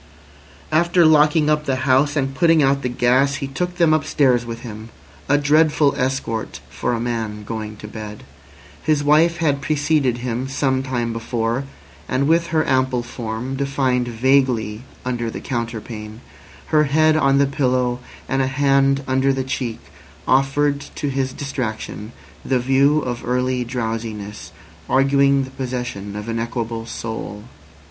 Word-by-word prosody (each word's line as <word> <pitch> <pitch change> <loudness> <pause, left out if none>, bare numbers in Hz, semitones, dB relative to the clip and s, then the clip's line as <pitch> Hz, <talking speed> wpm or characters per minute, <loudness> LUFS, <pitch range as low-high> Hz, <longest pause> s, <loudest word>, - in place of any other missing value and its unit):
After 170 +2 +4
locking 150 0 +5
up 150 0 +1
the 135 - 0
house 140 +2 +3
and 135 -2 0
putting 165 +1 +4
out 140 0 +2
the 125 - -2
gas 130 +3 +2
he 140 - -4
took 175 +6 -3
them 170 -3 +4
upstairs 140 -5 +2
with 115 0 -6
him—a 115 +5 -4
dreadful 150 0 +3
escort 125 -4 -2
for - - -2
a 115 - -1
man 115 -3 -3
going 110 -1 -6
to 105 - -9
bed. 105 -1 -8 0.6
His 150 -2 +1
wife 160 +4 +4
had 145 -4 +1
preceded 145 -4 +1
him 125 +1 -3
some 135 -1 0
time 120 -3 -2
before, 115 +2 -2 0.4
and 135 +2 +1
with 165 +1 +3
her 160 -2 0
ample 130 -2 +1
form 120 +2 -5
defined 135 -3 0
vaguely 120 -3 +1 0.2
under 120 -2 -2
the - - -6
counterpane, 115 -2 -5 0.5
her 150 0 +5
head 155 +2 +3
on 135 -3 +3
the 140 - +4
pillow, 125 -3 0 0.3
and 135 0 0
a 130 - +1
hand 135 0 +2
under 130 +1 +2
the 135 -1 -1
cheek 130 -3 -3 0.5
offered 140 +2 +2 0.2
to 145 - -2
his 130 -1 -1
distraction 120 -6 -5 0.3
the 130 - +1
view 135 +4 +3
of 120 -2 -3
early 125 +1 0
drowsiness 115 -3 -5 0.4
arguing 140 +1 +3
the 130 - -8
possession 120 -6 -5
of 105 +1 -6
an 115 0 -2
equable 115 -1 -3
soul. 110 -3 -6
130 Hz, 150 wpm, -21 LUFS, 115-140 Hz, 0.6 s, locking